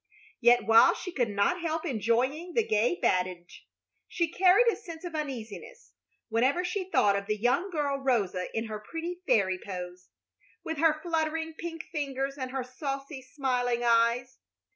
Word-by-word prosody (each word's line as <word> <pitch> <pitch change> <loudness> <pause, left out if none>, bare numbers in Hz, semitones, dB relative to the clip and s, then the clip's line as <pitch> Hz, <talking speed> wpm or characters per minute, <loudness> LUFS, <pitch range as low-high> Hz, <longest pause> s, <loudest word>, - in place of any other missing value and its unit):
Yet 240 0 +5
while 230 +11 +6
she 360 - -6
could 245 -8 0
not 210 - +1
help 325 0 -2
enjoying 260 - 0
the 460 - +3
gay 225 +11 +2
badinage, 180 -1 -1 0.4
she 340 -3 -1
carried 375 +6 +5
a - - 0
sense 335 -6 -10
of 345 - -6
uneasiness 300 - -6 0.4
whenever 260 +10 +1
she 370 +1 -3
thought 205 - +3
of 200 0 -3
the 215 0 0
young 245 - +1
girl 290 -5 -1
Rosa 210 -9 0
in 225 - -1
her 215 -1 -5
pretty 335 +9 -6
fairy 195 -7 +2
pose, 180 -1 -7 0.5
with 320 -2 -4
her 315 -1 +3
fluttering 325 -1 -1
pink 330 0 -6
fingers 275 -2 -2
and 260 -1 -3
her 265 0 -3
saucy, 275 +2 -5
smiling 250 -2 -1
eyes. 235 +2 +2
270 Hz, 160 wpm, -28 LUFS, 230-330 Hz, 0.5 s, while